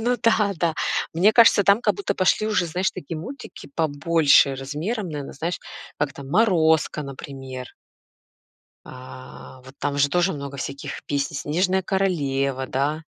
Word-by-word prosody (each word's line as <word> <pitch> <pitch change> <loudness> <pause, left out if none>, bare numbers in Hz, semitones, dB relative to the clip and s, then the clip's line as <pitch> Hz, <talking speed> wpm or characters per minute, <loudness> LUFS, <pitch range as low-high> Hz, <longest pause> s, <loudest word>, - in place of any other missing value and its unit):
Ну 245 +2 +1
да, 220 -3 +3
да. 165 -1 0 0.4
Мне 195 +6 +4
кажется, 225 -4 +6
там 200 +3 +5
как - - +1
будто 400 - -2
пошли 185 +3 +2
уже, 210 -5 +1
знаешь, 180 +4 -1
такие 160 +3 -7
мультики 250 - -9
побольше 155 -2 +3
размером, 155 - -4
наверное, 145 -3 -6
знаешь, 165 +5 -3 0.4
как 145 -1 -1
там 135 0 -10
"Морозко", 160 -6 +2
например. 135 -2 -8 1.2
А 130 0 -12
вот 130 +1 -14
там 145 0 -2
же 145 0 +4
тоже 180 +3 +2
много 140 -1 -7
всяких 140 0 -6
песни. 140 +2 -2
"Снежная 185 +7 0
королева", 140 -9 -1
да. 145 +5 -1
155 Hz, 145 wpm, -23 LUFS, 140-190 Hz, 1.2 s, кажется